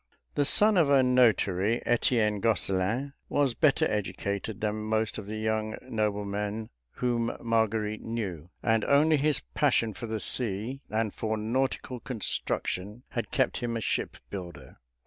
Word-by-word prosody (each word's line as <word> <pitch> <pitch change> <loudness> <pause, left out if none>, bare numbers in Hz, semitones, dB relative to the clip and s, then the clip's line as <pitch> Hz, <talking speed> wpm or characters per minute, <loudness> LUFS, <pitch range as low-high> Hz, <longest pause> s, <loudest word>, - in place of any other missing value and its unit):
The 145 - +1
son 210 +7 +5
of 160 -5 +4
a 135 -2 +5
notary, 115 -4 +3
Etienne 115 -3 +2
Gosselin 110 +5 +1 0.2
was 140 -4 +2
better 155 +6 +3
educated 100 - -2
than 105 0 -1
most 110 0 -1
of 100 - -8
the 110 +1 -4
young 110 0 -1
noblemen 105 -2 -2 0.2
whom 120 -2 -1
Marguerite 110 -2 0
knew, 95 -8 -4
and 115 -2 +2
only 150 +2 +4
his 150 +1 +1
passion 120 -6 +2
for 115 - -6
the 110 0 -2
sea 115 +5 -1
and 110 -1 -1
for 110 0 -2
nautical 125 +3 -1
construction 105 -2 -3
had 115 -4 -3
kept 130 -3 +1
him 120 -1 -2
a - - -4
shipbuilder. 85 -11 -5
110 Hz, 140 wpm, -28 LUFS, 105-125 Hz, 0.2 s, son